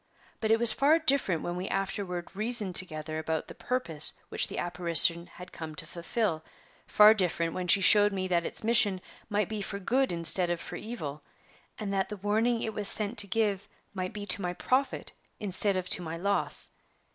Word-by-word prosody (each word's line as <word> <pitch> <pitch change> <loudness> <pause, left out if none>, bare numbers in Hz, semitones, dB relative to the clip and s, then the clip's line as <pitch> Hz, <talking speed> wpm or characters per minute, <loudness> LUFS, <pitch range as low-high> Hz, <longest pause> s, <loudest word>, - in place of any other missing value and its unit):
But 220 - -2
it 225 - +4
was 235 0 +3
far 295 +4 +3
different 275 - 0
when 175 - -4
we 180 +2 -5
afterward 195 -2 -4
reasoned 215 -2 +2
together 155 -3 +4
about 160 0 -4
the - - -10
purpose 165 -12 -1 0.2
which - - +2
the - - -8
apparition 170 0 +2
had 180 +1 -13
come 160 -1 -9
to 160 - -5
fulfill 170 0 -3 0.4
far 210 +1 +6
different 170 -5 -2
when 180 -1 -5
she 195 - +5
showed 205 +1 +5
me 190 -1 -3
that 175 -2 0
its - - -4
mission 215 -4 +3 0.3
might 205 -2 -1
be 215 -1 -5
for 200 0 -5
good 255 +7 0
instead 170 +1 +1
of 175 -1 -2
for - - -9
evil, 155 -11 -7 0.6
and 205 -2 -5
that 190 -1 -1
the 210 - -7
warning 220 +4 -1
it 220 - -4
was 205 -1 +1
sent 215 +2 +1
to 200 - +7
give 205 -1 -1 0.3
might 185 -2 -4
be 210 -1 -7
to 205 - -2
my 180 -1 -3
profit 260 +9 -2 0.3
instead 200 0 +1
of 185 -1 -4
to - - 0
my 165 -1 -6
loss. 200 +3 +2
195 Hz, 195 wpm, -28 LUFS, 175-215 Hz, 0.6 s, to